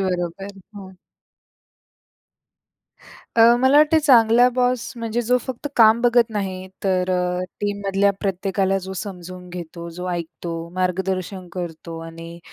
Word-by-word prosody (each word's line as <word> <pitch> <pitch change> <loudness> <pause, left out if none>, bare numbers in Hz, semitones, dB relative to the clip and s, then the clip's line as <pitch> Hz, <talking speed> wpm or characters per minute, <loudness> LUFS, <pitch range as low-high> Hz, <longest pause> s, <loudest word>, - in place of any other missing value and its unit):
बरोबर. 180 0 -2 0.3
हं. 190 -2 -11 2.4
अ, 230 - +6 0.2
मला 260 +3 +5
वाटतंय 305 +1 +5
चांगला 245 -4 +5
बॉस 250 -1 0
म्हणजे 230 +1 -2
जो 250 +2 +2
फक्त 260 +3 -5
काम 225 0 +6
बघत 240 -1 +4
नाही, 190 -3 -4 0.2
तर 185 -1 +1
अ, 180 0 0 0.2
टीममधल्या 200 -1 +1
प्रत्येकाला 195 0 0
जो 190 - -6
समजून 180 -1 -7
घेतो, 170 -1 -8
जो 180 +2 -6
ऐकतो, 170 0 -5 0.2
मार्गदर्शन 185 0 -2
करतो 165 -2 -6
आणि 165 +1 -10
190 Hz, 120 wpm, -22 LUFS, 180-225 Hz, 2.4 s, अ